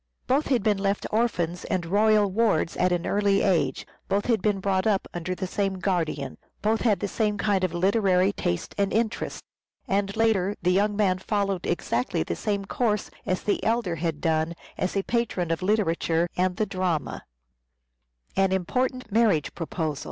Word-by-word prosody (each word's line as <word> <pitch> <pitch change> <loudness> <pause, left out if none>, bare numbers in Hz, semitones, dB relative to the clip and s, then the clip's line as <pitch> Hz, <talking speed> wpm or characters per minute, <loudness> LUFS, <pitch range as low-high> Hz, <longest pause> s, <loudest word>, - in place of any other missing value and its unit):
Both 275 +4 +1
had 250 -6 +1
been 210 -2 +2
left 200 0 0
orphans 180 -7 0
and 180 -2 -1
royal 210 +2 +3
wards 200 -6 +1
at 180 0 +2
an 175 -1 0
early 200 -1 +2
age, 155 -9 +1 0.2
both 200 +1 +1
had 230 -5 +2
been 205 -1 +1
brought 190 0 +1
up 200 -3 +1
under 175 +1 -3
the 190 - -3
same 195 +1 -1
guardian, 170 -7 -2 0.2
both 220 +1 +2
had 210 -6 +2
the 205 - 0
same 210 0 0
kind 200 -2 +1
of 185 - +1
literary 190 +1 +2
tastes 85 - -2
and 200 -1 +1
interests, 225 0 -1 0.4
and 200 +1 0
later 205 -3 +2
the 180 - +1
young 205 +3 +2
man 190 -3 +2
followed 195 -2 -1
exactly 120 - 0
the 85 - -3
same 200 - -2
course 210 -1 -1 0.2
as 185 - -1
the 205 - 0
elder 220 -7 0
had 160 -2 -2
done 160 +1 0 0.2
as 185 +2 -2
a 195 - +1
patron 210 -8 -1
of 165 - -1
literature 175 -4 +1
and 180 0 +1
the 215 - +1
drama. 185 -7 -2
195 Hz, 160 wpm, -26 LUFS, 175-210 Hz, 0.4 s, royal